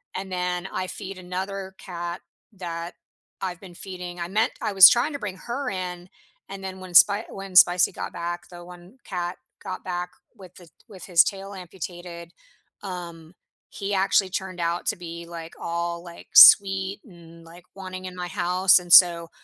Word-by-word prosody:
And 190 0 -5
then, 180 0 -3
I 185 -1 -4
feed 190 +1 -8
another 190 +1 -6
cat 175 -1 -7 0.3
that 170 -2 -7 0.5
I've 180 -2 -4
been 185 -3 -12
feeding. 180 -1 -7
I 170 - -4
meant 215 +5 0
I 205 - -2
was 190 -1 +10
trying 250 +6 +1
to 285 - -5
bring 190 -5 -6
her 250 +6 -5
in, 180 -2 -6 0.4
and 195 0 -8
then 190 0 -7
when 185 -1 -10
Spi 205 +5 +6
when 195 -1 -9
Spicy 180 0 +6
got - - -6
back, 175 0 -6
the 175 -1 -11
one 180 +6 -15
cat 175 -1 -4 0.2
got 185 - -7
back 180 -1 -4 0.2
with 185 -2 -15
the 175 -2 -16 0.2
with 190 -4 -11
his 175 -3 +5
tail 195 0 -6
amputated, 175 -1 -9 0.5
um, 170 -3 -8 0.4
he 200 0 -5
actually 195 0 +2
turned 190 -2 -5
out 170 +1 -2
to - - +2
be, 170 -1 -9
like, 165 -1 -9
all, 170 0 -4
like, 170 -1 -13
sweet 195 0 +7
and, 170 -4 -16
like, 170 +2 -15
wanting 185 -1 -8
in 185 0 -8
my 180 0 -5
house, 180 +2 +3
and 175 -1 -10
so 170 -2 +7
180 Hz, 175 wpm, -24 LUFS, 175-190 Hz, 0.5 s, was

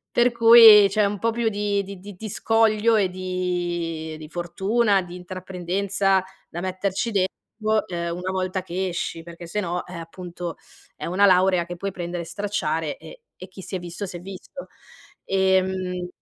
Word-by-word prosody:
per 240 0 +4
cui 230 -3 +9
c'è 210 +1 +2
un 200 0 -1
po' 230 +3 +1
più 230 -1 0
di 205 -1 0
di 195 -1 -9
di 205 +1 -10
di 215 +3 -7
scoglio 225 +1 +2
e 195 -3 +2
di 175 -3 -3
di 155 - -9
fortuna, 195 +5 +1
di 175 -1 -9
intraprendenza 185 +1 -1 0.3
da 170 - -6
metterci 190 +4 -2
dentro, 215 +3 -1
ehm, 170 -1 -3
una 180 +1 -4
volta 185 0 -2
che 185 +1 -3
esci, 165 -1 -4
perché 170 0 -10
sennò, 180 -2 -2
eh, 180 - -10
appunto 175 +1 -7 0.4
è - - -7
una 185 +4 +3
laurea 185 -2 +4
che 175 +1 -7
puoi 195 +2 -3
prendere 175 -1 -5
e - - -10
stracciare 165 -6 -2
e - - -13 0.2
e 185 - -9
chi 190 +1 -11
si 190 - -6
è 185 - -2
visto 175 +3 -6
s'è 175 -2 -7
visto, 195 - -9 0.6
ehm 190 -1 +1
185 Hz, 170 wpm, -23 LUFS, 175-205 Hz, 0.6 s, cui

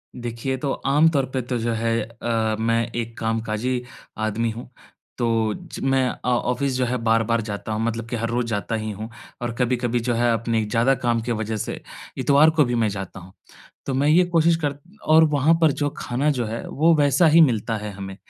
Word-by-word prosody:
देखिए 120 +2 -4
तो 135 +1 -2
आम 150 +4 +4
तौर 140 -4 +1
पे 130 - 0
तो 125 0 -3
जो 115 +1 -1
है 115 +1 0
अ, 115 -1 -2
मैं 115 +1 +1
एक 115 -1 -4
कामकाजी 115 +2 -1 0.4
आदमी 115 +2 -1
हूँ 115 +2 -9 0.5
तो 115 -3 +1
ज - - -9
मैं 135 -1 +2
अ - - -4
ऑफ़िस 125 +3 0
जो 125 0 +1
है 125 +1 -1
बार-बार 115 0 +2
जाता 100 +2 -5
हूँ 110 +1 -1
मतलब 115 0 -2
कि 120 - -2
हर 115 0 -2
रोज़ 120 +1 0
जाता 110 +1 -2
ही 110 0 -3
हूँ। 110 +3 -7 0.3
और 120 -1 -2
कभी-कभी 120 -1 0
जो 120 - +2
है 120 0 +2
अपने 115 -1 0
ज़्यादा 115 +5 +2
काम 120 -1 +1
की 120 +2 -3
वजह 110 0 -2
से - - -4 0.4
इतवार 145 +3 +5
को 160 -1 +3
भी 120 - -1
मैं 115 -2 +2
जाता 95 -1 -6
हूँ। 90 +1 -14 0.5
तो 135 - -2
मैं 140 +3 +2
ये 175 +4 +5
कोशिश 165 0 +4
कर 145 -1 0 0.4
और 160 0 +7
वहाँ 145 +3 +3
पर 160 -2 +5
जो 145 - +2
खाना 135 +5 -1
जो 125 -4 -1
है 115 +2 -5
वो 165 +4 +3
वैसा 145 +3 +4
ही 165 +2 +6
मिलता 115 -6 +2
है 105 0 -5
हमें। 95 -1 -8
120 Hz, 215 wpm, -23 LUFS, 115-135 Hz, 0.5 s, और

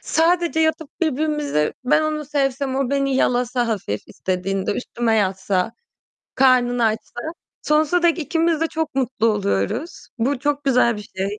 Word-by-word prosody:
sadece 335 0 +1
yatıp 315 -1 0
birbirimize 300 - 0
ben 255 - +3
onu 305 -1 -2
sevsem 270 -1 -1
o 270 -2 0
beni 275 -1 +1
yalasa 245 -1 +1
hafif 190 - -2
istediğinde, 190 +1 -2
üstüme 235 -2 -1
yatsa, 190 -1 0 0.6
karnını 245 -2 +3
açsa, 220 +2 -2 0.4
sonsuza 310 +3 +2
dek 340 0 +3
ikimiz 325 +1 0
de 325 - +2
çok 320 -3 -3
mutlu 250 -3 0
oluyoruz. 205 - -1
Bu 260 +4 0
çok 290 +2 -1
güzel 250 -4 +3
bir 210 - -9
şey. 200 +2 -2
260 Hz, 140 wpm, -21 LUFS, 220-305 Hz, 0.6 s, ben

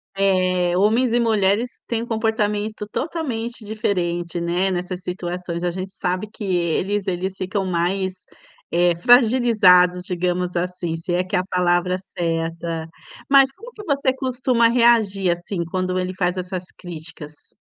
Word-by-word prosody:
Eh, 185 -2 +2
homens 225 +6 +3
e 240 - +3
mulheres 220 +1 +1
têm 230 -1 -1
um - - -5
comportamento 215 -2 -1
totalmente 245 -8 -3
diferente, 175 -5 -2
né, 175 +3 0
nessas 180 0 -3
situações, 180 -1 -4
a 175 - 0
gente 190 +1 -6
sabe 185 +4 -2
que 215 0 -9
eles 185 +2 0
eles 185 +1 -2
ficam 190 +1 -2
mais 185 0 -1 0.5
é 175 0 +4
fragilizados, 215 -6 +5
digamos 180 0 -1
assim, 175 -1 -2
se 165 +2 -4
é 180 +1 +2
que 185 - -3
é - - +3
a 185 - -3
palavra 180 0 +1 0.2
certa, 165 -1 -2 0.4
mas 275 -1 +6
como 465 +6 -12
que 425 - -10
você 280 -4 +1
costuma 255 -2 +1
reagir 225 -6 +3
assim, 175 +1 -3
quando 185 +1 -2
ele 185 0 -2
faz 180 -1 0
essas 185 0 -4
críticas? 160 -3 -10
185 Hz, 145 wpm, -21 LUFS, 175-220 Hz, 0.5 s, mas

